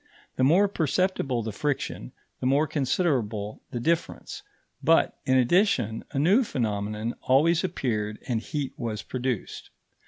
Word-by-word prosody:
The 130 - +1
more 175 +10 +5
perceptible 160 - 0
the 110 - -3
friction, 140 - -3 0.3
the 125 - -1
more 140 +4 +3
considerable 130 - -1
the 120 - -4
difference; 165 +6 -2 0.4
but, - - +4
in 130 - +4
addition, 125 - +2
a 145 - -5
new 190 - +4
phenomenon 110 - -2
always 160 +7 +3
appeared 110 - -2
and 115 -3 0
heat 145 0 -4
was 115 -4 -3
produced. 130 -3 -4
130 Hz, 130 wpm, -26 LUFS, 115-160 Hz, 0.4 s, more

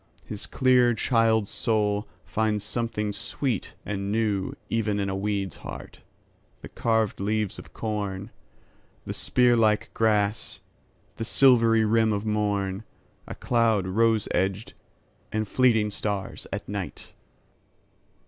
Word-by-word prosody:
His 105 -1 -3
clear 125 -2 +3
child's 110 -2 +2
soul 105 -2 0 0.2
finds 110 -2 0
something 105 -2 -2
sweet 120 +1 -3
and 100 0 -3
newEven 105 0 -1
in 100 -1 -1
a - - -2
weed's 100 -4 -2
heart, - - -9 0.6
the - - -8
carved 110 -2 0
leaves 105 0 -1
of - - -12
corn, 105 -1 -4 0.7
The - - -4
spear 125 -1 +3
like 110 -2 +2
grass, 105 -1 +1 0.6
the - - -3
silvery 115 -2 +5
rim 110 0 +3
of 100 +1 -2
morn,A 105 -1 -3
cloud 115 -5 +2
rose 110 +2 +2
edged, 95 +3 -1 0.6
and 110 0 -1
fleeting 110 -3 +3
stars 100 -1 -4
at - - -5
night! - - -6
105 Hz, 115 wpm, -26 LUFS, 100-115 Hz, 0.7 s, silvery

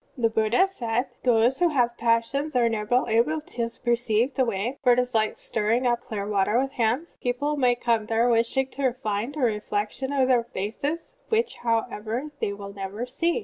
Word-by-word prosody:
'" - - -37
(i6) - - -7
The 225 - +5
Buddha 220 - +3
said: 245 -9 -1 0.2
"Those 245 +2 +3
who 355 - +4
have 245 -5 +1
passions 235 +6 0
are 240 -1 +4
never 225 +2 0
able 235 +8 +2
to 240 -6 -4 0.2
perceive 240 +1 +1
the 260 - +2
Way; 230 +3 -2
for 250 -3 +5
it - - 0
is 250 0 0
like 215 -1 +1
stirring 225 +3 0
up 240 -1 +1
clear 205 -2 -5
water 210 +1 +1
with 270 +1 0
hands; 250 +6 -1
people 270 +5 -1
may 250 -4 +3
come 230 -3 0
there 225 +2 +2
wishing 235 +3 +2
to 265 -2 -1
find 235 +1 -3
a - - -5
reflec 210 -2 0
tion 265 +1 -4
of 270 -2 +2
their 250 -2 +3
faces, 280 - -4
which, 455 +1 0
however, 230 +3 -2
they - - -1
will 200 0 -8
never 200 +4 -5
see. 335 - 0
240 Hz, 200 wpm, -25 LUFS, 220-265 Hz, 0.2 s, The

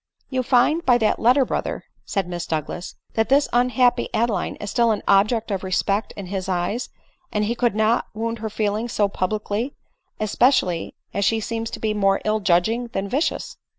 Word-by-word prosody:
" - - -44
You 260 - 0
i - - +1
find 265 +6 +3
by 245 -2 +5
that 220 -3 +1
letter, 255 +4 +4
brother," - - -3 0.2
said 195 -4 -1
Miss 175 -1 -5
Douglas, 160 +2 -4
" - - -38
that 225 0 +1
this 280 +2 +4
unhappy 245 0 +3
Adeline 230 -2 0
is 205 - -6
still 235 -2 +3
an 215 - 0
object 215 +3 +3
of 195 -1 -2
respect 195 +3 0
in 200 - -5
his 190 0 -4
eyes, 185 +6 -1 0.4
and 210 0 0
he 230 - 0
could 240 -3 0
not 220 +2 +2
wound 230 +1 -3
her 220 0 -3
feelings 215 +2 -2
so 205 - +3
public 205 +2 -3
ly, 225 +6 0 0.5
especially 215 -5 +2 0.2
as 200 - 0
she 220 +3 +2
seems 225 +1 -3
to - - -7
be 215 -1 0
more 195 -2 +2
ill 215 0 +1
judging 205 +6 +2
than 195 +1 -2
vicious." 280 +10 -2
215 Hz, 200 wpm, -22 LUFS, 195-240 Hz, 0.5 s, by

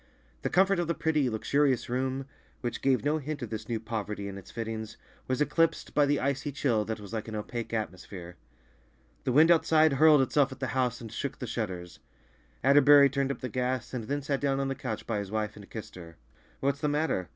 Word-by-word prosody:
The - - -1
comfort 190 0 +3
of 175 - 0
the 170 - 0
pretty, 150 -5 +1
luxurious 130 +3 +1
room, 130 +2 -2 0.4
which 120 -3 -3
gave 135 0 +2
no 150 +2 +2
hint 145 -1 -5
of 115 - -6
this 110 0 -5
new 115 -2 -1
poverty 105 -2 -4
in 100 - -6
its 100 -2 -10
fittings, 110 -1 -5 0.3
was 130 +2 -1
eclipsed 160 +3 +1
by 145 -1 +4
the 145 0 +2
icy 140 +2 -1
chill 125 -6 +1
that 110 0 -4
was 105 +1 -10
like 110 -1 -3
an 110 - -5
opaque 115 +2 -4
atmosphere. 95 -5 -5 0.9
The - - +1
wind 155 +6 +6
outside 160 -2 +4
hurled 150 0 +6
itself 140 +1 +2
at 130 - -9
the 130 -1 -2
house 125 -2 0
and 115 -2 -8
shook 140 +4 -4
the - - -5
shutters. 95 -7 -5 0.6
Atterbury 140 +1 +7
turned 140 0 0
up - - -6
the 130 - -2
gas, 125 +1 -2
and 120 -4 -3
then 145 +4 -2
sat 140 -1 -1
down 135 -1 +1
on 135 0 -1
the - - 0
couch 125 -5 -5
by 110 -3 -1
his 100 -2 -5
wife 105 0 -2
and 100 -2 -12
kissed 110 -3 -8
her. 85 -3 -11 0.4
"What's 140 +1 0
the 150 - +1
matter?" 145 - 0
130 Hz, 220 wpm, -29 LUFS, 110-145 Hz, 0.9 s, Atterbury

